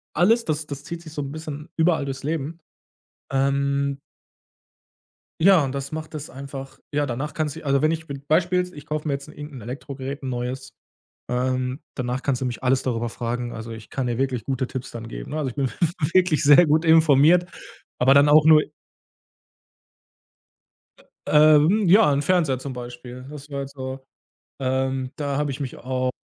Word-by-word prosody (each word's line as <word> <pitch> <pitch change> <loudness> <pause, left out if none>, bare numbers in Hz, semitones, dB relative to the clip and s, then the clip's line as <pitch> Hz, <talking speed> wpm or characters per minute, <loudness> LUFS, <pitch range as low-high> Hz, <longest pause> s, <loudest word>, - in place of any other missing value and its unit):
alles 230 +6 +3
das 155 -1 -1
das 140 -1 -7
zieht 170 +2 -7
sich 155 - -11
so 150 - -3
'n 140 -1 -5
bisschen 155 0 -7
überall 160 -3 +2
durchs 135 0 -5
Leben. 160 +2 -3 0.7
Ähm 140 +1 +1 1.4
Ja, 185 -5 +6
und 130 - -3
das 140 0 -4
macht 155 +1 -6
es 150 -1 -6
einfach 135 0 -9
ja, 145 0 +1
danach 135 +5 -4
kannst 155 -3 -2
du - - -7
die - - -15
also, 140 -1 +2
wenn 155 +2 +3
ich 165 0 -3
mit 140 0 -8
Beispiel: 180 +3 +2
Ich 145 -1 -10
kauf 155 0 -4
mir 140 - +1
jetzt 140 +1 -6
'n 150 - -13
irgend'n 145 -5 -9
Elektrogerät, 135 +3 -6
'n 135 - -4
neues. 125 +1 -4 0.6
Ähm, 130 +2 -1
danach 125 0 -3
kannst 135 -3 0
du 130 - -1
mich 125 +1 -6
alles 130 +1 +3
darüber 120 -2 -1
fragen, 120 +1 -4
also, 115 +1 -7
ich 115 -1 -10
kann 130 -2 -2
dir 120 -1 -1
wirklich 130 -4 -1
gute 130 -1 -1
Tipps 130 0 -6
dann 115 -1 -8
geben, - - -8
ne? 155 - -3
Also, 145 -4 -1
ich - - -16
bin 135 -2 0 0.4
wirklich 180 -5 +3
sehr 145 +5 +8
gut 155 +2 +2
informiert, 160 +2 +6 0.5
aber 135 +2 +5
dann 145 +1 +6
auch 155 +1 +6
nur 155 -1 +7 2.6
Ähm, 155 +7 +5
ja, 200 -3 +6
'n 140 +1 +1
Fernseher 160 -6 +2
zum 130 +1 -6
Beispiel. 125 +1 -9
Das 150 0 -10
war 140 0 -3
jetzt 140 0 -7
so 130 0 -6 0.6
ähm, 130 0 -1
da 140 -2 -2
habe 145 0 0
ich 135 +2 -6
mich 135 -3 -4
auch 130 0 -2
140 Hz, 185 wpm, -23 LUFS, 130-155 Hz, 2.6 s, sehr